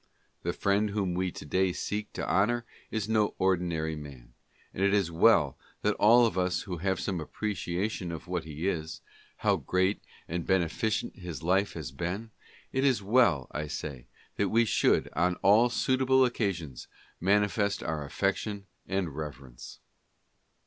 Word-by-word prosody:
The 85 - -1
friend 100 +3 +1
whom 100 -3 -1
we 90 0 -1
to - - -9
day 95 +4 +1
seek 105 +3 -3
to - - -4
honor 120 +5 +2 0.2
is 110 -2 -2
no 110 -2 +1
ordinary 85 -4 0
man, 65 -5 -11 0.4
and 95 - -2
it 100 +1 +4
is 95 -5 +1
well 85 - +4 0.2
that 105 - +3
all 120 +3 +6
of 95 -5 0
us 90 -2 0
who 90 -4 -5
have 95 +2 -1
some 95 -4 -2
appreciation 90 +1 -3
of 85 +1 -7
what 90 -2 -2
he 80 +3 -4
is 80 -4 -3 0.2
— - - -28
how - - +4
great 95 +2 0 0.3
and 85 +1 -3
beneficent 95 +4 0
his 85 -5 -7
life 95 +4 +2
has 80 -6 -6
been 90 +10 -4 0.2
— - - -26
it 135 0 +1
is 130 -7 +2
well, 100 - +3
I 75 0 -3
say, 70 -5 -6 0.3
that 100 - +1
we 115 +3 +4
should, - - +2
on 90 +3 +1
all 110 +5 +6
suitable 130 +1 +3
occasions, 90 - -3 0.3
manifest 100 +2 +1
our 80 -2 -2
affec 95 +7 0
tion 100 -2 -5 0.2
and 90 -6 -2
reverence. 70 -5 -8
95 Hz, 165 wpm, -29 LUFS, 80-105 Hz, 0.4 s, all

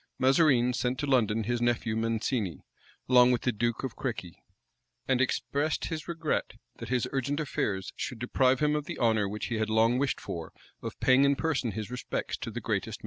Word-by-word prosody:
[] - - -52
Mazarine 130 -2 +4
sent 125 +1 -1
to 145 - -2
London 115 -5 +2
his 120 +2 -1
nephew 120 -2 +1
Mancini, 115 - -1 0.4
along 125 -1 +6
with 125 - 0
the 125 - +2
duke 120 +2 -1
of 130 - -4
Crequi; 105 -9 -4 0.7
and 130 -1 +2
expressed 140 +3 0
his 160 -1 -5
regret 170 -1 -2 0.2
that - - -7
his 125 -2 +1
urgent 140 +2 -1
affairs 105 -10 -2
should 125 - -4
deprive 130 +2 +2
him 150 0 +3
of 150 -1 -2
the - - -6
honor 110 -4 +2
which 105 +1 -4
he 115 -2 -1
had 110 0 0
long 115 +3 +3
wished 140 -1 0
for, 85 -2 -6 0.3
of - - -6
paying 130 +2 +5
in 140 0 +4
person 135 -8 -1
his 110 +3 -5
respects 125 - -3
to - - -5
the - - -5
greatest - - -16
man - - +2
in - - -17
the - - -8
world. - - -6
125 Hz, 215 wpm, -29 LUFS, 110-135 Hz, 0.7 s, along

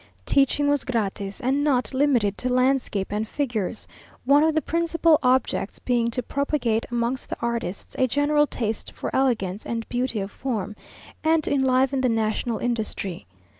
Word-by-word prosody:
Teaching 280 +1 +3
was 285 -1 +2
gratis, 200 -4 -2
and 270 +3 +1
not 270 -3 +1
limited 255 -7 +2
to 250 - -1
landscape 255 -6 +1
and 215 +1 -1
figures, 235 -6 -3 0.4
one 280 +3 +5
of 320 0 +2
the 315 - +3
principal 330 -1 +2
objects 255 -6 +1
being 240 -2 0
to 245 +2 -3
propagate 275 -5 -1
amongst 240 +1 -2
the - - -4
artists 235 -5 -3
a 260 - +4
general 295 +3 +2
taste 220 -5 -3
for - - -5
elegance 220 -7 0
and 230 -1 -4
beauty 245 -2 -1
of 195 0 -4
form, 215 -6 -3 0.5
and 320 0 +3
to - - 0
enliven 265 0 +2
the 255 - +2
national 225 +1 0
industry. 215 - -3
250 Hz, 160 wpm, -24 LUFS, 220-280 Hz, 0.5 s, one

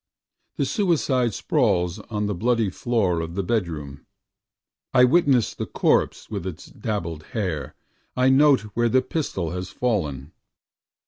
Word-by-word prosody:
The - - +1
suicide 145 - +1
sprawls 95 - +1
on 105 -1 -1
the 105 - -1
bloody 115 +1 +1
floor 100 -5 0
of 80 +1 -6
the 100 - -1
bedroom, 80 -10 -3 0.9
I 125 - +7
witness 130 -3 +3
the - - -5
corpse - - +1
with 100 -4 -5
its 90 - -7
dabbled 85 -8 -4 0.2
hair, 90 -9 -3 0.4
I 130 +1 +4
note 140 +1 +5
where 120 +2 +2
the 130 +2 +3
pistol 125 - -3
has 90 +1 -5
fallen. 80 - -2
105 Hz, 135 wpm, -24 LUFS, 85-125 Hz, 0.9 s, I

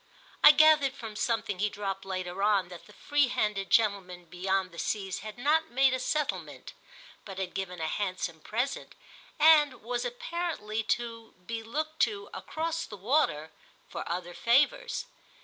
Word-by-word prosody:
I - - +12
gathered 300 -2 +6
from 225 -2 -8
something 215 -4 -1
he 210 +2 +1
dropped 195 -1 -5
later 185 0 -4
on 200 -3 +2
that 175 -1 -11
the - - -15
free 290 +4 +1
handed 210 -5 -1
gentleman 195 -5 +1
beyond 185 +2 -1
the 170 - -10
seas 195 -3 -2
had 215 +2 -8
not 310 +5 +2
made 265 +1 +3
a 260 - 0
settlement, 300 +3 -3 0.5
but 195 -2 -9
had 190 -2 -4
given 180 -2 -4
a 160 - -2
handsome 180 -1 -3
present 240 - -3 0.4
and 295 -5 +5
was 240 +1 -2
apparently 245 -4 -3 0.2
to 230 -1 -9
be 230 +3 -4
looked 310 +8 -4
to, 415 -1 0
across 330 +1 -3
the 205 - -9
water, 195 - +1 0.4
for - - -5
other 175 0 -4
favours. 285 - +2
220 Hz, 155 wpm, -29 LUFS, 190-280 Hz, 0.5 s, I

